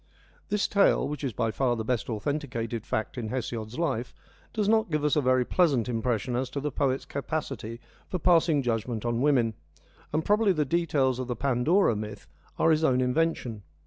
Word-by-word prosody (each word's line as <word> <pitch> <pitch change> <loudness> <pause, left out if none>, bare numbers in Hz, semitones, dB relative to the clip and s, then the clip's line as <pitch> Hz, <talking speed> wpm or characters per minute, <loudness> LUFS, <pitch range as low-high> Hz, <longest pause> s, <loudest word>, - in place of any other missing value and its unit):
This 210 0 +1
tale, 200 -1 +3
which 150 0 -5
is 135 - -1
by 115 +1 -1
far 125 0 +1
the 110 -1 -4
best 120 -2 -1
authenticated 115 -2 -3
fact 110 +3 -2
in 115 - -4
Hesiod's 115 -2 -4
life, 130 -7 -2 0.4
does 210 -2 -1
not 220 -2 +3
give 150 -2 0
us 150 - +3
a 150 - +3
very 130 -1 +3
pleasant 140 - +2
impression 120 0 -1
as 125 +1 -1
to 140 - -4
the 150 +1 -2
poet's 135 -1 0
capacity 135 -5 -4 0.3
for 185 - -2
passing 165 -4 +3
judgment 115 -1 -2
on 120 0 0
women, 130 -6 +3 0.6
and 155 +1 -1
probably 210 -1 +3
the 155 -3 0
details 140 -5 +1
of 130 - -3
the 125 - -2
Pandora 135 - +2
myth 105 0 -6 0.3
are 165 - +4
his 155 0 +2
own 130 -5 +3
invention. 125 -4 0
130 Hz, 185 wpm, -27 LUFS, 120-155 Hz, 0.6 s, are